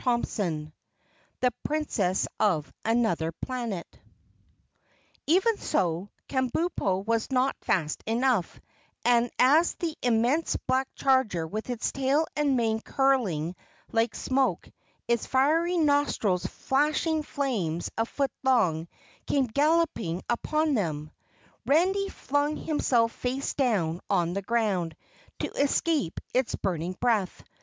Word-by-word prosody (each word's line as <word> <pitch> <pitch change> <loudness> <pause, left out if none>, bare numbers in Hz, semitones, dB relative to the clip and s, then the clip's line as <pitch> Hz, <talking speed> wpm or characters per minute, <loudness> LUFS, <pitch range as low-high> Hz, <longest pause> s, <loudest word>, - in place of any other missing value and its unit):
CHAPTER 240 -2 +1
7 155 -6 -3 0.7
The 250 -1 +2
Princess 225 -12 0
of 165 -8 +1
Anuther 220 -8 +1
Planet 235 -9 -3 1.4
Even 385 +8 +3
so, 175 +2 -1 0.2
Kabumpo 255 - 0
was 230 0 0
not 265 0 +1
fast 155 -4 0
enough, 230 -4 +1 0.5
and 240 0 +4
as 305 +7 +4
the 330 -3 -3
immense 245 +7 +2
black 260 +1 +2
charger 260 -11 +2
with 215 +8 -5
its 245 -2 -1
tail 275 +4 +1
and 285 -3 +2
mane 225 -2 +1
curling 210 - +1 0.4
like 225 0 +1
smoke, 265 0 0 0.4
its 235 -1 0
fiery 320 +7 +2
nostrils 285 - +2
flashing 305 +3 0
flames 220 - -2
a 225 - +1
foot 275 0 -1
long, 185 -12 +2 0.4
came 275 -2 +2
galloping 280 - +1
upon 305 +5 0
them, 155 - -2 0.6
Randy 380 +7 +3
flung 290 -1 -1
himself 240 -7 +1
face 260 +3 -3
down 190 - 0
on 175 -3 +1
the 200 - -2
ground 195 -7 0 0.5
to - - -2
escape 285 - 0
its 255 -1 +1
burning 175 -1 -2
breath. 220 -7 0
245 Hz, 115 wpm, -27 LUFS, 190-285 Hz, 1.4 s, and